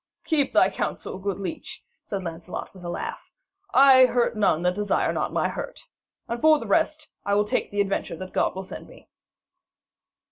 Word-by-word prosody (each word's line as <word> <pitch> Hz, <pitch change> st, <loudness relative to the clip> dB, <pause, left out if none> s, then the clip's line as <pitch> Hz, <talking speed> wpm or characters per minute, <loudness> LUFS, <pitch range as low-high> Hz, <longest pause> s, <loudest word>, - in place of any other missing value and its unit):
'Keep 300 Hz, -4 st, +1 dB
thy -, -, +5 dB
counsel, 185 Hz, -, -4 dB
good 200 Hz, 0 st, -2 dB
leech,' 185 Hz, -4 st, -6 dB, 0.2 s
said 200 Hz, -2 st, -3 dB
Sir -, -, -9 dB
Lancelot 170 Hz, +1 st, -6 dB
with 185 Hz, -2 st, -13 dB
a 175 Hz, -, -5 dB
laugh. 175 Hz, -, -5 dB, 0.5 s
'I 260 Hz, -1 st, +8 dB
hurt 240 Hz, -2 st, +1 dB
none 190 Hz, -6 st, +2 dB
that 180 Hz, 0 st, +2 dB
desire 205 Hz, +1 st, 0 dB
not -, -, -1 dB
my -, -, +1 dB
hurt. -, -, -6 dB, 0.5 s
And, 235 Hz, 0 st, -4 dB
for 315 Hz, 0 st, +6 dB
the -, -, -6 dB
rest, 310 Hz, -2 st, 0 dB
I 200 Hz, 0 st, +1 dB
will 210 Hz, 0 st, +3 dB
take 210 Hz, -, -1 dB
the 205 Hz, 0 st, 0 dB
adventure 195 Hz, -3 st, -2 dB
that 185 Hz, +2 st, -8 dB
God -, -, +1 dB
will 190 Hz, -, -4 dB
send 190 Hz, -, -9 dB
me.' -, -, -17 dB
205 Hz, 190 wpm, -25 LUFS, 185-260 Hz, 0.5 s, I